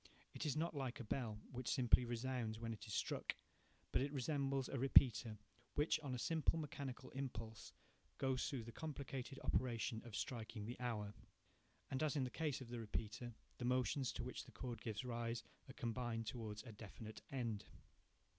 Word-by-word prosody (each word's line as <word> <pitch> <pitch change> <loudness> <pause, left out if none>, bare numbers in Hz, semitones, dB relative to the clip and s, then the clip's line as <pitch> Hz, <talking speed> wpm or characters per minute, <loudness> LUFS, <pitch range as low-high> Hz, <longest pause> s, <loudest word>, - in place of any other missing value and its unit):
It - - -1
is 150 - +1
not 165 +2 +1
like 135 -1 -1
a - - -3
bell, 110 -1 -1
which 125 -1 -2
simply 125 -2 +6
resounds 120 -2 0
when 115 0 -1
it 110 - -8
is 105 - -4
struck, - - 0 0.6
but - - +4
it 140 +1 +1
resembles 140 -1 +1
a 135 - -1
repeater, 115 -4 +7 0.4
which, 150 +2 +4
on 140 -4 -2
a - - -1
simple 160 +5 +3
mechanical 140 -4 -4
impulse, 115 -5 -4 0.5
goes 130 +1 +2
through 135 -6 -2
the 115 - -7
complicated 135 -2 -4
operation 115 -2 +2
of 120 -4 -6
striking 110 0 -2
the 120 +3 -4
hour. 110 -5 -1 0.8
And 130 - +1
as 155 -2 +3
in 140 - +3
the 125 - -1
case 150 -3 0
of 125 - -7
the 120 0 -3
repeater, 115 +2 -2 0.2
the 120 - -1
motions 125 +1 +3
to - - -2
which 125 - -4
the - - -12
cord 120 -4 -4
gives 110 +2 -2
rise 115 -1 -1 0.3
are - - -6
combined 115 -1 -1
towards 110 -3 -3
a 120 - -7
definite 110 +1 -8
end. 115 -6 -1
125 Hz, 180 wpm, -43 LUFS, 115-135 Hz, 0.8 s, repeater